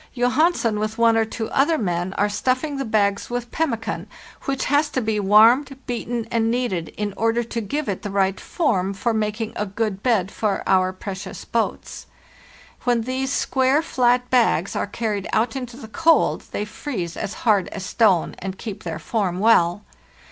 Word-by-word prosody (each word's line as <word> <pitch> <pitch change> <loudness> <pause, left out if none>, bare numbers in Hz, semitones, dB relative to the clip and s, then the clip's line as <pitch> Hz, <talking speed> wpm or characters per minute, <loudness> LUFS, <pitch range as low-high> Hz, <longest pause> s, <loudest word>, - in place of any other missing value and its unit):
Johansen 250 -2 +2
with 215 +1 -2
one 230 -1 +4
or 225 0 +3
two 220 0 -4
other 295 +4 +3
men 175 - -2
are 205 - +1
stuffing 255 +7 -1
the 275 - -2
bags 205 -3 +1
with 245 -1 -4
pemmican, 230 -9 -2 0.4
which 270 -1 -1
has 290 +2 +2
to 265 - -1
be 220 -3 -1
warmed, 230 +7 +5
beaten, 240 -1 -3
and 225 -1 +1
kneaded 230 -9 -1
in 210 -1 -2
order 230 +2 +1
to 230 0 -4
give 285 +8 -3
it 195 -3 -2
the 205 - -5
right 195 -1 +1
form 195 - 0
for 235 +3 0
making 215 +1 -2
a 210 - -2
good 200 -1 -2
bed 205 -6 +1
for 210 -3 -1
our 185 -1 +3
precious 190 +1 -7
boats. 230 -1 -3 0.8
When 240 -2 +2
these 260 +2 -2
square, 270 +3 +2
flat 250 -4 +2
bags 225 -8 +2
are - - -1
carried 205 -2 -3
out 225 +2 +1
into 250 -2 -6
the 255 - -9
cold 325 +8 +2
they 210 - -3
freeze 205 - -5
as 205 -2 -4
hard 205 -5 +3
as 190 -2 -6
stone, 185 -3 +2
and 190 0 -5
keep 210 -2 -7
their 165 -2 -4
form 185 +1 -1
well. 195 -3 +3
225 Hz, 175 wpm, -22 LUFS, 200-250 Hz, 0.8 s, warmed